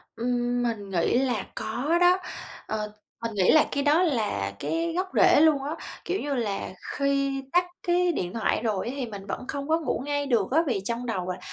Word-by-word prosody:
Ừm, 245 +1 0
mình 220 -4 -2
nghĩ 180 +4 +2
là 245 -6 0
có 290 +10 0
đó. 355 +1 +6 0.5
Ờ, 210 -1 -3 0.3
mình 230 -1 -3
nghĩ 185 -3 +4
là 310 - +6
cái 280 0 0
đó 305 +5 +4
là 215 - 0
cái 330 0 -1
gốc 370 +2 0
rễ - - +6
luôn 305 -4 +4
á. 295 +3 -3 0.3
Kiểu 385 - -1
như 290 0 -2
là, 215 -6 -2 0.3
khi 275 -1 +1
tắt 355 0 +4 0.2
cái 350 0 +3
điện 180 - -3
thoại 225 -1 0
rồi 215 -3 -1
á 245 - -3
thì 265 - -2
mình 200 -4 -8
vẫn 250 - -5
không 280 -1 -4
có 320 +1 +2
ngủ 315 - -2
ngay 285 0 -1
được 235 -7 +1
á, 305 - +4
vì 240 -7 0
trong 235 +1 -2
đầu 185 -6 -2
là, 180 - -5
255 Hz, 215 wpm, -26 LUFS, 220-300 Hz, 0.5 s, đó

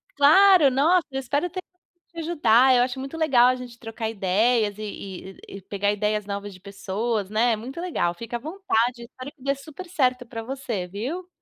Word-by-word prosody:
Claro, 315 +1 +6
nossa, 320 +7 +3
espero 270 +5 -2
ter 370 +2 -5 0.5
te 335 - -9
ajudar. 265 -6 +4
Eu 245 - +4
acho 255 +1 -3
muito 270 +5 -6
legal 265 -7 +4
a 255 - +3
gente 250 -2 -10
trocar 225 -1 -5
ideias 210 +2 +1
e 195 -3 -8
e - - -9
e - - -11
pegar 200 +2 -1
ideias 210 0 -1
novas 200 0 -5
de 185 - -14
pessoas, 200 +2 -3
né. 230 +3 +2
É - - +1
muito 255 +9 -8
legal, 335 - -1
fica 230 +6 -6
à - - -13
vontade, 250 - -1
espero 255 +4 -10
que 265 - -20
dê 275 0 +1
super 310 +6 -11
certo 255 -7 0
para 230 -1 -7
você, 235 -7 -4
viu? 265 - -5
245 Hz, 195 wpm, -24 LUFS, 210-285 Hz, 0.5 s, Claro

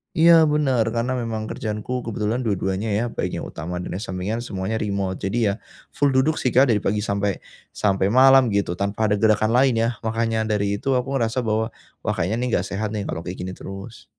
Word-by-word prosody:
Iya, 165 -1 +7
benar. 140 -6 +2
Karena, 125 +2 -1
memang 110 -2 -3
kerjaanku 110 +3 -4
kebetulan 115 +2 -2
dua-duanya 100 +1 -1
ya, 110 +4 +1
baik - - -3
yang - - -4
utama 90 +2 -5
dan 90 - -5
yang 105 - -5
sampingan, 95 +5 -3
semuanya 95 +2 -3
remote. 100 -3 -2
Jadi 110 +2 +1
iya, 100 - 0 0.4
full 140 -2 +1
duduk 140 +4 +2
sih 125 - 0
Kak, 130 0 +5
dari 110 - +4
pagi 105 +1 -1
sampai 100 -1 -1 0.3
sampai 100 0 +1
malam 130 -3 +6
gitu, 100 -3 0
tanpa 100 +2 0
ada 105 - +2
gerakan 110 0 +3
lain 130 -1 +4
ya. 115 - +2 0.2
Makanya 115 0 0
dari 100 -2 0
itu, 135 +6 -1
aku 135 +2 0
ngerasa 115 +2 0
bahwa, 110 0 -1 0.3
wah, - - +1
kayaknya 100 +7 -1
nih, - - -1
enggak - - +1
sehat 105 +2 -3
nih 105 -2 -3
kalau 85 +1 -4
kayak 90 +1 -6
gini 95 +1 -6
terus. 95 +4 -9
110 Hz, 205 wpm, -23 LUFS, 100-125 Hz, 0.4 s, Iya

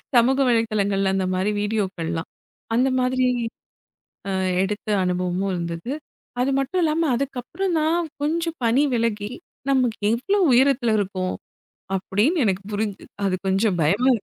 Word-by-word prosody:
சமூக 255 +3 +4
வலைதளங்கள்ல 205 -4 +1
அந்த 190 -1 0
மாதிரி 190 +3 +1
வீடியோக்கள்லாம். 185 -6 -2 0.5
அந்த 255 +3 +3
மாதிரி 255 0 +2 1.0
அ - - -1 0.3
எடுத்த 210 +2 -4 0.2
அனுபவமும் 180 +1 -1
இருந்தது. 170 +5 -4 0.5
அது 265 +2 +2
மட்டும் 350 +7 0
இல்லாம 320 +1 +2
அதுக்கப்புறதான் 310 +6 -1 0.2
கொஞ்சம் 330 +2 -1
பனி 240 +5 +4
விலகி 225 -2 -1 0.4
நமக்கு 250 -4 +1 0.2
எவ்ளோ 395 +13 0
உயரத்துல 250 -2 +4
இருக்கோம் 185 -2 -2 0.6
அப்டின்னு 230 - +1
எனக்குப் 195 +1 -1
புரிஞ்சுது. 205 -1 -3 0.2
அது 190 -1 +1
கொஞ்சம் 190 0 +2
பயமா 200 - +3
இருக் 215 - -6
225 Hz, 120 wpm, -23 LUFS, 195-265 Hz, 1.0 s, சமூக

